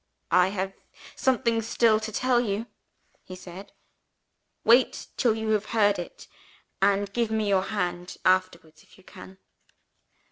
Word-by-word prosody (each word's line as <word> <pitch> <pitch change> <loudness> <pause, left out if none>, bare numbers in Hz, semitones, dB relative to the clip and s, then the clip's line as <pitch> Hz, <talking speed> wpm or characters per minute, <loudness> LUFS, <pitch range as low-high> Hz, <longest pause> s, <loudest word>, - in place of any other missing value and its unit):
"'I 180 +1 +5
have 195 0 -3 0.4
something 235 -3 +1
still 225 0 +2
to 220 0 -6
tell 250 +2 +1
you,' 215 -1 -2 0.6
he 185 - -10
said. 185 +1 -11 0.9
'Wait 240 +3 +3
till 230 -3 +2
you 220 0 -3
have 215 -1 +1
heard 205 -3 +3
it; 175 - -9 0.5
and 200 0 +1
give 235 -2 0
me 220 -1 -1
your 190 -1 +2
hand 180 -4 -4
afterwards 185 -4 0
if - - -22
you 190 - -20
can.' 190 +1 -13
205 Hz, 140 wpm, -26 LUFS, 185-220 Hz, 0.9 s, I